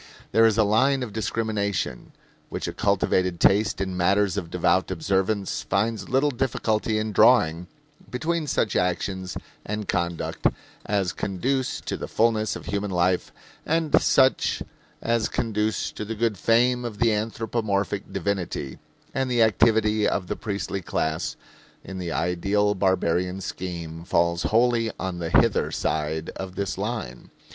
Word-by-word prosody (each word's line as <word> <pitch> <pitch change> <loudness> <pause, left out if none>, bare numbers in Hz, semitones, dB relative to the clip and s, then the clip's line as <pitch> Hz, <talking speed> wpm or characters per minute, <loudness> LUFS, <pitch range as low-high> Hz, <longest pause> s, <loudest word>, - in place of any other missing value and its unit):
There 115 0 +6
is 110 -1 +1
a 110 - +5
line 130 +6 +3
of 110 -5 -6
discrimination, 105 - -2 0.4
which - - -4
a - - -4
cultivated 90 -2 +1
taste 105 0 +3
in 95 -1 -2
matters 100 +2 +2
of 90 -5 -3
devout 90 +2 +1
observance 95 +3 0
finds 105 0 -1
little 135 +3 +2
difficulty 110 -4 0
in 110 0 -1
drawing, 90 -6 +4 0.4
between 160 +4 -1
such 110 - 0
actions 90 0 -1 0.3
and 105 -1 -4
conduct 85 -2 -1 0.4
as 100 -3 0
conduce 125 +8 -1
to - - -4
the - - -5
fullness 110 -2 +1
of - - -8
human 100 +1 -2
life 90 0 +1 0.3
and 160 -1 +2
such 130 0 +3 0.4
as 115 -1 +1
conduce 110 -1 -1
to - - -6
the 115 +2 -4
good 115 0 0
fame 120 +5 +2
of 115 -4 -5
the 115 -1 +3
anthropomorphic 105 -2 -2
divinity; 95 -8 -3 0.3
and 135 -1 -1
the 120 -2 +4
activity 110 0 +3
of 95 - -1
the - - -3
priestly 100 -2 -3
class, 80 -2 -2 0.5
in 95 -1 -7
the 85 -2 -4
ideal 100 +5 +1
barbarian 90 -1 +1
scheme, 85 -3 -6
falls 85 0 +1
wholly 115 +2 +2
on 95 -2 -3
the 85 -1 -3
hither - - +3
side 80 +1 -2
of 95 -1 -6
this 100 -2 -2
line. 105 - -4
100 Hz, 145 wpm, -25 LUFS, 90-115 Hz, 0.5 s, There